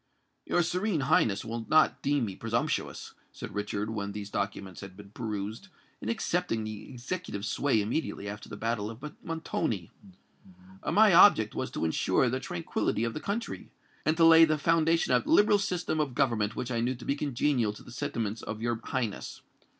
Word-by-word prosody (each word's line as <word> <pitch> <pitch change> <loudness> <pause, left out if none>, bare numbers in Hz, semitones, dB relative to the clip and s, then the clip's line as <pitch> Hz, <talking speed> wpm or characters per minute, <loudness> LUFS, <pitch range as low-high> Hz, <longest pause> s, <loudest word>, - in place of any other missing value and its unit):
"Your 175 - +2
Serene 180 0 0
Highness 120 -7 +2
will 115 0 -5
not 155 0 +4
deem 140 -3 +1
me 95 -3 -5
presumptuous," 115 +2 -2 0.2
said - - -8
Richard, 105 +1 -2
when 100 -2 -4
these 105 -1 -6
documents 100 -2 -4
had 95 -2 -10
been 100 -1 -12
perused, 110 - -5 0.3
"in - - -4
accepting 180 - -1
the 110 -1 -7
executive 125 - -5
sway 130 +1 +1
immediately 105 0 -2
after 100 0 -7
the 105 - -7
battle 110 -1 -2
of 130 +7 -8
Montoni. 160 - -3 1.0
My 210 -2 +6
object 165 - +7
was - - -3
to - - -3
ensure 95 +9 +2
the 130 - -1
tranquillity 85 +2 -2
of 115 -1 -1
the - - -4
country, 215 +4 -4 0.3
and 155 +1 +1
to 165 - +6
lay 165 0 +9
the 155 -1 +3
foundation 165 +2 +2
of - - +3
that - - -6
liberal 210 -8 +5
system 180 -5 -1
of 140 -5 -1
government 115 -6 +1
which 125 0 -4
I 115 - 0
knew 125 +2 0
to 120 - -11
be 140 - +1
congenial 135 -5 0
to - - -13
the - - -13
sentiments 115 -5 -3
of 110 -1 -5
your 120 0 -2
Highness. 120 -6 -3
120 Hz, 180 wpm, -29 LUFS, 105-155 Hz, 1.0 s, lay